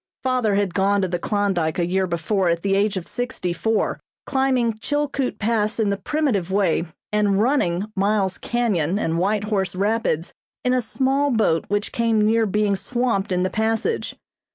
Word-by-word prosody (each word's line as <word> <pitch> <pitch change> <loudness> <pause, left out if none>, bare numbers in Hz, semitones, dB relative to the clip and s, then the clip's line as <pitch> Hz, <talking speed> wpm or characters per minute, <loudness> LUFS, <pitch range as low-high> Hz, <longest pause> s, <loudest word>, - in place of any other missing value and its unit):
Father 250 -6 +1
had 200 -3 0
gone 200 +1 +2
to - - +1
the 175 -1 -2
Klondyke 190 -6 0
a 175 - +1
year 190 +2 0
before 175 +2 0
at 170 0 0
the 195 -1 +1
age 200 0 +1
of 180 - -5
sixty 245 -8 -3
four, 220 +5 0 0.3
climbing 260 -4 +1
Chilkoot 285 -1 -1
Pass 220 0 0
in 210 -2 +2
the - - +1
primitive 215 - -1
way 190 -4 +1 0.3
and 205 -2 +2
"running" 205 -7 +1
Miles 195 -1 +1
Canyon 200 -8 0
and 165 -5 -1
White 200 +3 +1
Horse 195 -4 -1
Rapids 200 -4 0 0.3
in 250 - +2
a 255 - +2
small 270 +4 +1
boat 215 - +2
which 205 +1 -1
came 225 -2 +2
near 225 +1 +3
being 205 0 +1
swamped 200 0 -1
in 180 0 +1
the 185 - -1
passage. 225 - -1
205 Hz, 175 wpm, -22 LUFS, 190-230 Hz, 0.3 s, near